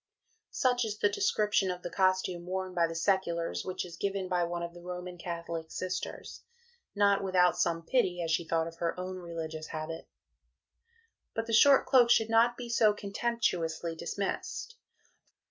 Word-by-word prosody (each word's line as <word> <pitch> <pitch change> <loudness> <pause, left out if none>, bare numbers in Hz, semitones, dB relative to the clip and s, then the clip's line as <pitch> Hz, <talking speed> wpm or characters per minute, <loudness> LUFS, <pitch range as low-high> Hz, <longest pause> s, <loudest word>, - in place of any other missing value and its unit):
'" 445 -1 -43
Such 250 -1 +1
is 215 -2 -3
the 205 - +3
description 205 -1 +1
of 180 0 -4
the - - -4
costume 185 -2 +1
worn 185 0 -3
by 170 -2 +2
the 165 - -6
seculars 170 -1 0
which 185 - -4
is 170 -2 -10
given 195 0 -2
by 180 -1 +1
one 170 0 -3
of 170 0 -5
the 175 - -12
Roman 180 0 -6
Catholic 170 -2 -5
Sisters, 185 +1 -5 0.5
not 200 -1 +3
without 180 -2 +3
some 165 -1 0
pity 180 -6 +1
as 165 - -2
she 165 - +2
thought 165 0 +1
of 165 0 -8
her 170 +1 -2
own 185 0 -4
religious 160 -3 -6
habit. 160 +1 -6 1.3
But 225 - -1
the 230 - -4
short 275 +5 +7
cloak 250 -3 +5
should 225 -1 +4
not 235 +1 +4
be 245 - -6
so 225 -2 +4
contemptuously 200 -6 -1
dismissed. 200 - -4
185 Hz, 170 wpm, -30 LUFS, 170-205 Hz, 1.3 s, short